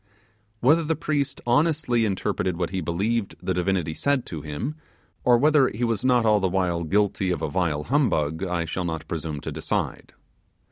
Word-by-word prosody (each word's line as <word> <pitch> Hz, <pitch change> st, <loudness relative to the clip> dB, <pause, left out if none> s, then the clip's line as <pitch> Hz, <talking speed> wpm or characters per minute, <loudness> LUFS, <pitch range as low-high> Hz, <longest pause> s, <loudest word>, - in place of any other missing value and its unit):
Whether 155 Hz, +7 st, +4 dB
the 160 Hz, +1 st, 0 dB
priest 145 Hz, -3 st, -2 dB
honestly 125 Hz, -2 st, +2 dB
interpreted 95 Hz, -3 st, -1 dB
what 85 Hz, -2 st, -2 dB
he 95 Hz, -1 st, -2 dB
believed 100 Hz, +6 st, -1 dB
the 95 Hz, -, -2 dB
divinity 90 Hz, -3 st, 0 dB
said 140 Hz, -, 0 dB
to 80 Hz, -3 st, -6 dB
him, 80 Hz, -, -4 dB, 0.5 s
or 125 Hz, -2 st, +5 dB
whether 145 Hz, 0 st, +4 dB
he 115 Hz, +1 st, -4 dB
was 115 Hz, 0 st, 0 dB
not 125 Hz, -2 st, +3 dB
all 105 Hz, -1 st, +4 dB
the 95 Hz, -1 st, +1 dB
while 90 Hz, -2 st, 0 dB
guilty 100 Hz, +1 st, +1 dB
of 90 Hz, -, -2 dB
a -, -, 0 dB
vile 80 Hz, -5 st, 0 dB
humbug, 85 Hz, -, +1 dB
I 90 Hz, -3 st, -1 dB
shall 90 Hz, +3 st, -3 dB
not 80 Hz, -1 st, -4 dB
presume 80 Hz, -3 st, -4 dB
to -, -, -5 dB
decide. -, -, -3 dB
95 Hz, 180 wpm, -25 LUFS, 85-125 Hz, 0.5 s, or